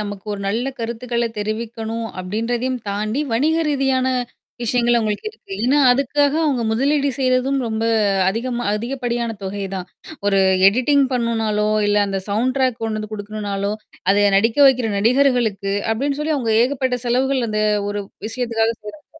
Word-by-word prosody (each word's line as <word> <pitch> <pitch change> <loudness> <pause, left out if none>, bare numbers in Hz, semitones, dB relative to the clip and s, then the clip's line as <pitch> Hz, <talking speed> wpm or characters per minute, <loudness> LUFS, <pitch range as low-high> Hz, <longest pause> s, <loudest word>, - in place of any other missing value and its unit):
நமக்கு 205 -2 -6
ஒரு 200 - -5
நல்ல 235 +6 -1
கருத்துக்கள 235 +1 -2
தெரிவிக்கணும் 225 +1 -4
அப்பிடின்றதையும் 235 +7 -2
தாண்டி, 215 +6 -1
வணிக 295 +8 +2
ரீதியான 270 -3 +1 0.6
விஷயங்கள் 240 0 +2
அவுங்களுக்கு 215 - -1
இருக்கு. 425 - -14
ஏன்னா 275 +4 +3
அதுக்காக 280 +2 +2 0.2
அங்க 255 -5 0
முதலீடு 280 +5 +1
செய்யிறதும் 260 +1 +1
ரொம்ப 220 0 -2 0.4
அதிகமா 240 +4 -2
அதிகப்படியான 235 0 -2
தொகை 195 +1 -4
தான். 185 -1 -5 0.4
ஒரு 200 -1 +3 0.3
எடிட்டிங் 265 +6 +3
பண்ணுனாலோ! 225 -3 0 0.2
இல்ல 205 0 +2
அந்த 195 -1 -2
சவுண்ட் 235 +5 0
ட்ராக் 255 -3 +1
கொண்டு 220 -1 -2
வந்து 215 0 -7
குடுக்கணுனாலோ, 205 -1 -3 0.4
அத 205 +1 +4
நடிக்க 225 +6 +2
வைக்கிற 255 -4 +3
நடிகர்களுக்கு 230 -4 +2 0.2
அப்பிடின்னு 280 +5 -2
சொல்லி 310 +1 0
அவுங்க 235 -5 0
ஏகப்பட்ட 255 -1 0
செலவுகள் 255 +1 +1
அந்த 215 0 0 0.3
ஒரு 205 0 -3 0.3
விஷயத்துக்காக 230 -1 0
செய்றாங்க. 290 +9 -10
235 Hz, 140 wpm, -20 LUFS, 215-255 Hz, 0.6 s, அத